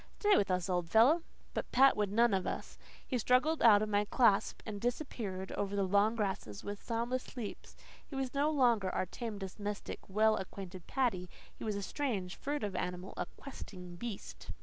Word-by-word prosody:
"Stay 415 Hz, -1 st, +5 dB
with 200 Hz, -, +2 dB
us, 180 Hz, 0 st, 0 dB
old 175 Hz, -3 st, -1 dB
fellow." 255 Hz, -, +6 dB, 0.3 s
But -, -, -3 dB
Pat 270 Hz, +2 st, +6 dB
would 210 Hz, -2 st, 0 dB
none 230 Hz, +1 st, +4 dB
of 190 Hz, -1 st, 0 dB
us. -, -, -5 dB, 0.3 s
He 255 Hz, -, -1 dB
struggled 255 Hz, +8 st, +3 dB
out 215 Hz, -3 st, +7 dB
of 215 Hz, -, -2 dB
my 205 Hz, 0 st, +2 dB
clasp 210 Hz, -3 st, +3 dB
and 205 Hz, -2 st, -5 dB
disappeared 230 Hz, -7 st, -3 dB
over 200 Hz, 0 st, -2 dB
the 200 Hz, -, +2 dB
long 200 Hz, +4 st, +3 dB
grasses 190 Hz, -, -3 dB
with 205 Hz, 0 st, -5 dB
soundless 240 Hz, +3 st, -3 dB
leaps. 220 Hz, -4 st, -6 dB, 0.3 s
He 280 Hz, -, -8 dB
was 265 Hz, -2 st, -2 dB
no 285 Hz, +2 st, +2 dB
longer 240 Hz, -10 st, +3 dB
our 185 Hz, -, -1 dB
tame, 220 Hz, +3 st, -5 dB
domestic, 205 Hz, +1 st, -5 dB
well 215 Hz, +2 st, +4 dB
acquainted 190 Hz, -1 st, -7 dB
Paddy. 210 Hz, -10 st, 0 dB, 0.2 s
He -, -, -10 dB
was 215 Hz, -2 st, -1 dB
a 200 Hz, -, -3 dB
strange, 200 Hz, -9 st, -2 dB
furtive 275 Hz, -9 st, -3 dB
animal 180 Hz, +1 st, -3 dB
a -, -, -3 dB
"questing 180 Hz, -10 st, -9 dB
beast." 220 Hz, +2 st, -7 dB
210 Hz, 185 wpm, -33 LUFS, 190-245 Hz, 0.3 s, out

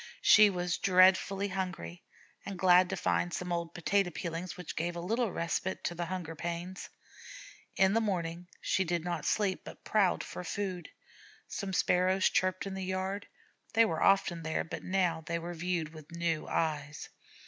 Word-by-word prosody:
She 210 Hz, 0 st, +8 dB
was 180 Hz, -2 st, -2 dB
dreadfully 190 Hz, +1 st, +4 dB
hungry, 185 Hz, -2 st, -4 dB, 0.4 s
and 195 Hz, -1 st, -6 dB
glad 180 Hz, 0 st, +5 dB
to 190 Hz, -, -2 dB
find 175 Hz, +1 st, 0 dB
some 180 Hz, +1 st, -4 dB
old 170 Hz, -1 st, -3 dB
potato 195 Hz, +2 st, +1 dB
peelings, 170 Hz, +1 st, -5 dB
which 180 Hz, -3 st, -7 dB
gave 170 Hz, +2 st, -2 dB
a -, -, -4 dB
little 220 Hz, +5 st, 0 dB
respite 170 Hz, +3 st, -2 dB
from 175 Hz, -, -5 dB
the 175 Hz, -, -2 dB
hunger 175 Hz, -3 st, -4 dB
pang. 170 Hz, +3 st, -4 dB, 1.0 s
In 190 Hz, 0 st, +4 dB
the 225 Hz, -, +3 dB
morning 175 Hz, -4 st, -2 dB
she 190 Hz, -, +1 dB
did 170 Hz, -2 st, -1 dB
not 175 Hz, -2 st, -3 dB
sleep, 200 Hz, -3 st, +1 dB
but -, -, -11 dB
prowled 200 Hz, -4 st, +2 dB
for 180 Hz, -, -7 dB
food. 185 Hz, -2 st, -4 dB, 0.6 s
Some 200 Hz, -2 st, -4 dB
Sparrows 185 Hz, +1 st, +3 dB
chirruped 185 Hz, 0 st, +1 dB
in 195 Hz, -, -4 dB
the 190 Hz, 0 st, -4 dB
yard. 190 Hz, +2 st, -3 dB, 0.5 s
They 230 Hz, 0 st, +7 dB
were 165 Hz, -6 st, -2 dB
often 195 Hz, -4 st, +3 dB
there, 160 Hz, 0 st, -1 dB
but 165 Hz, -, -6 dB
now 180 Hz, -3 st, 0 dB
they 170 Hz, -, -1 dB
were 170 Hz, +1 st, -5 dB
viewed 170 Hz, -2 st, -2 dB
with 155 Hz, -2 st, -12 dB
new 170 Hz, -2 st, -1 dB
eyes. 150 Hz, -2 st, -2 dB
180 Hz, 170 wpm, -31 LUFS, 170-190 Hz, 1.0 s, She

